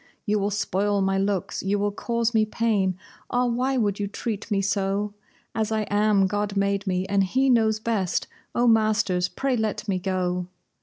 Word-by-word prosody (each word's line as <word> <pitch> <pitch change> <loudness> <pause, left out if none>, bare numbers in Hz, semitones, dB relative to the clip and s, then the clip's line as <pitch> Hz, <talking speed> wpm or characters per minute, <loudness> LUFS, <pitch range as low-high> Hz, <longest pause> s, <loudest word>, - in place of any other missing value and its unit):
You 210 -1 +1
will 200 +1 0
spoil 205 0 0
my 195 0 +1
looks, 195 -2 -1
you 195 +2 0
will 205 0 0
cause 235 +2 -1
me 220 -1 +4
pain; 210 -4 0 0.3
ah, 245 0 +1
why 250 +3 0
would 205 -4 0
you 205 - -1
treat 210 +1 -4
me 205 -2 +1
so? 200 +1 0 0.4
As 220 -1 -1
I 220 -1 +1
am, 205 -1 +3
God 205 +1 -1
made 200 0 0
me, 185 0 0
and 200 0 +2
He 260 +7 +2
knows 220 -2 +3
best! 215 -5 -1 0.3
Oh, 240 - +3
masters, 215 -5 +3
pray 270 -1 -1
let 220 -1 -2
me 190 -2 0
go!" 180 -1 -1
205 Hz, 185 wpm, -25 LUFS, 195-220 Hz, 0.4 s, me